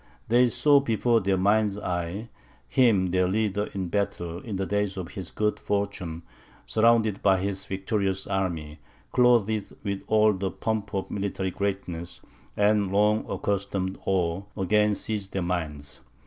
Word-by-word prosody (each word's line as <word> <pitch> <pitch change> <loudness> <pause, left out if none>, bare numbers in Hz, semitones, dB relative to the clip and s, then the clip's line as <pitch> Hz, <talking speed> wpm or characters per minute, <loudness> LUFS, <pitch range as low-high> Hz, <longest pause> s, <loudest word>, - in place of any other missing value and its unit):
They 125 +2 +5
saw 145 +4 +4
before 120 -2 +2
their 95 0 +1
mind's 100 +1 +2
eye 90 +4 -3 0.4
him 105 -9 +3
their 90 0 +2
leader 105 +1 0
in 95 -3 -4
battle, 85 -3 -2
in 105 0 -6
the 95 0 -1
days 105 -1 -1
of 90 -3 -5
his 95 -4 -6
good 105 0 -1
fortune, 100 -5 -3 0.4
surrounded 110 -2 +3
by 95 -2 +4
his 95 0 -3
victorious 95 0 -1
army, 80 -6 -2 0.3
clothed 115 -4 +3
with 100 -2 -2
all 110 -1 +4
the 95 0 -2
pomp 110 0 -3
of 95 - -3
military 95 -2 -2
greatness, 90 -3 -4 0.4
and 105 -2 +3
long 105 +2 +2
accustomed 100 -1 -2
awe 90 -2 0 0.2
again 105 +2 +2
seized 100 -1 -3
their 95 - -1
minds. 75 -6 -4
100 Hz, 145 wpm, -26 LUFS, 95-105 Hz, 0.4 s, They